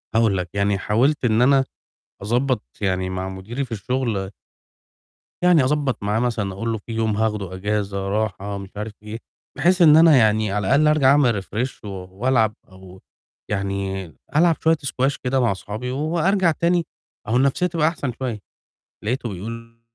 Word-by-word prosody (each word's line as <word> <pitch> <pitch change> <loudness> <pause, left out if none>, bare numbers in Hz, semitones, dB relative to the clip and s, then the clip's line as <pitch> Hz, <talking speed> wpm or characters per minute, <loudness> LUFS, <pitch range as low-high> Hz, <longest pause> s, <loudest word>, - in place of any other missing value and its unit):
هاقول 110 -4 +3
لك، 90 -1 -3
يعني 100 0 +1
حاولت 125 +8 +1
إن 110 0 +3
أنا 135 +1 +4 0.6
أضبّط 125 +5 0 0.2
يعني 95 -2 -1
مع 95 0 -3
مُديري 105 +9 -5
في 120 - -12
الشُغل 110 -3 -2 1.1
يعني 175 -6 +5
أضبّط 140 -4 0
معاه 105 +2 0
مثلًا 110 -5 -1
أقول 115 +4 -3
له 110 - -1
في 110 +2 -11
يوم 110 -2 0
هاخده 105 -4 -1
إجازة 100 0 -2
راحة 100 -1 -2
مش 100 -1 -8
عارف 105 +1 -5
إيه، 105 +1 -6 0.4
بحيث 180 +5 +3
إن 155 -2 +8
أنا 160 -4 +7
يعني 110 -2 +3
على 105 -1 -1
الأقل 150 +3 +4
أرجع 150 -3 +4
أعمل 120 -9 +3
refresh 120 +7 -4
و 105 - -7
وألعب 105 +4 0 0.2
أو 95 0 -14 0.5
يعني 100 -1 -2 0.3
ألعب 165 +1 +4
شوية 160 0 +4
سكواش 135 0 -1
كده 130 +1 -1
مع 120 -5 +2
أصحابي 110 +6 -5
وأرجع 170 +5 +1
تاني 170 +1 +1 0.4
أهو 115 +3 +2
النَفْسيّة 140 +7 +2
تبقى 165 -3 +1
أحسن 145 -6 -2
شوية، 120 -5 -3 0.6
لقيته 120 +1 -2
بيقول 115 +4 -8
115 Hz, 160 wpm, -22 LUFS, 100-135 Hz, 1.1 s, إن